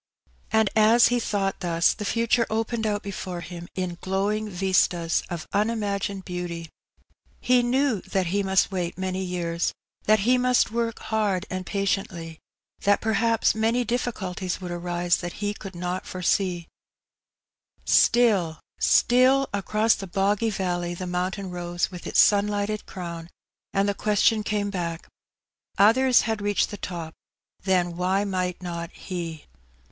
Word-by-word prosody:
And 220 -2 +2
as 220 +2 +6
he 245 0 +1
thought 195 -4 -1
thus, 170 -2 +2
the 210 - -6
future 230 +2 +1
opened 225 0 -1
out 205 -1 -1
before 190 -3 -5
him 175 0 -8
in 180 -2 -3
glowing 205 +3 -1
vistas 180 -3 +1
of 170 -2 -5
unimagined 200 -2 -1
beauty. 175 -2 -5 0.7
He 250 0 +3
knew 250 -3 +1
that 190 -1 -1
he 195 +4 0
must 190 0 +2
wait 175 -3 -3
many 190 0 -2
years; 175 -2 -2 0.3
that 215 -1 +4
he 250 +4 +3
must 250 -2 +3
work 230 0 -1 0.2
hard 205 -3 +1
and 185 0 -4
patiently; 190 -5 -2 0.4
that 205 0 +3
perhaps 225 0 +2
many 225 +3 +1
difficulties 200 -6 -3
would 180 -2 -6
arise 175 0 0
that 175 -1 -5
he 205 0 -2
could 195 -2 -9
not 180 +1 -4
foresee; 180 -1 0 1.2
still, 200 -10 +3 0.2
still, 260 +2 +4
across 215 +3 +2
the 195 - -6
boggy 200 +4 +1
valley 175 -3 -2
the 185 - -5
mountain 185 +2 -3
rose 175 +1 -2
with 180 -2 -8
its - - +1
sunlighted 205 +1 +2
crown, 170 -2 -7 0.4
and 195 +1 +1
the 200 - +1
question 210 +2 +2
came 205 -1 -1
back 170 -3 -4 0.4
— - - -67 0.3
Others 245 +5 +5
had 220 -2 -2
reached 205 0 +1
the 205 - -6
top, 170 -4 -6 0.5
then 180 -2 +1
why 185 +3 +1
might 185 -2 -2
not 170 -1 -4
he? 170 -4 -6
195 Hz, 145 wpm, -25 LUFS, 175-215 Hz, 1.2 s, as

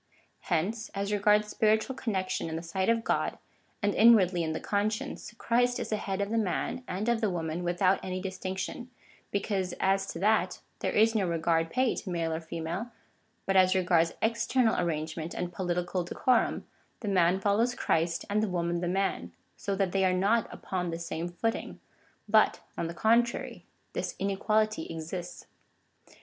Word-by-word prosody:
Hence, 200 +6 0
as 200 +1 -2
regards 210 +1 +3
spiritual 220 +4 +1
connec 190 -7 -2
tion 185 -3 -2
in 160 - -4
the 165 - -4
sight 190 +4 -1
of 230 0 +2
God, - - 0 0.5
and 205 0 +2
inwardly 195 -6 +5
in 160 -1 -1
the 155 - -2
conscience, 210 +1 -2
Christ 245 +1 +1
is - - -4
the 215 - 0
head 195 -1 -3
of 200 +1 -2
the 230 - +2
man 215 +5 -2
and 195 +5 -3
of 235 -1 +2
the 215 - +2
woman 165 -1 -3
without 185 +2 +2
any 185 0 -3
distinction, 190 +5 -5 0.4
because, 195 -3 -1
as 195 0 +2
to - - -6
that, 190 -1 +2 0.2
there - - -1
is 220 +1 +4
no 205 -5 +1
regard 165 -1 +1
paid 255 +3 +1
to 195 - -5
male 165 -2 -1
or 160 - -3
female; 170 +7 -4 0.6
but 195 - 0
as 185 0 +5
regards 175 -3 +2
external 230 +1 +2
arrangement 160 -1 -2
and 175 0 -3
political 180 0 -1
decorum, 240 +7 +1 0.4
the 220 - -5
man 185 -1 +3
follows 215 +5 +2
Christ 165 +1 0
and 205 +1 +1
the 215 - 0
woman 170 -1 -1
the 175 - -1
man, 195 +2 -1 0.2
so 200 -1 -3
that 195 -2 0
they 195 0 +1
are 185 -1 +3
not 210 +4 +2
upon 180 -2 -3
the 165 - -3
same 170 0 -4
footing, 225 +6 -3 0.5
but, 215 +1 +4 0.2
on 165 - -2
the 170 - -6
contrary, 235 +4 +1 0.3
this - - -3
inequality 215 0 0
exists. 165 +2 -6
190 Hz, 175 wpm, -29 LUFS, 175-215 Hz, 0.6 s, inwardly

